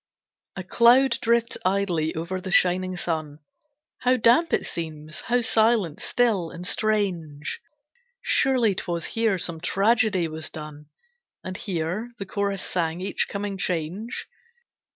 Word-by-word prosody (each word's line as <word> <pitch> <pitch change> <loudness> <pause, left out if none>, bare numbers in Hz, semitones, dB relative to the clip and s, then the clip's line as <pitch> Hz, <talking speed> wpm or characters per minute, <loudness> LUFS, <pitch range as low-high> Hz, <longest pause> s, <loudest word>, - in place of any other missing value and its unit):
A 190 - -5
cloud 235 +5 +4
drifts 235 0 +1
idly 185 -5 0
over 175 +3 -4
the 190 - -6
shining 185 0 +3
sun. 155 -4 -3 0.6
How 255 +1 +2
damp 245 +9 +4
it - - +1
seems, 155 -1 -5
how 245 +1 +1
silent, 220 -7 +2
still, 215 -9 +1
and 175 +2 -8
strange! 180 -9 -1 0.6
Surely 250 -6 +2
't 190 - -5
was 170 -1 -2
here 225 -4 0
some 165 -2 -2
tragedy 200 -1 +2
was 160 0 -6
done, 150 -1 -9 0.6
And 185 - -6
here 190 +5 -3
the 200 - -5
chorus 200 0 -2
sang 170 -1 -1
each 190 - -1
coming 200 -1 -4
change? 180 +6 -3
190 Hz, 130 wpm, -25 LUFS, 165-225 Hz, 0.6 s, cloud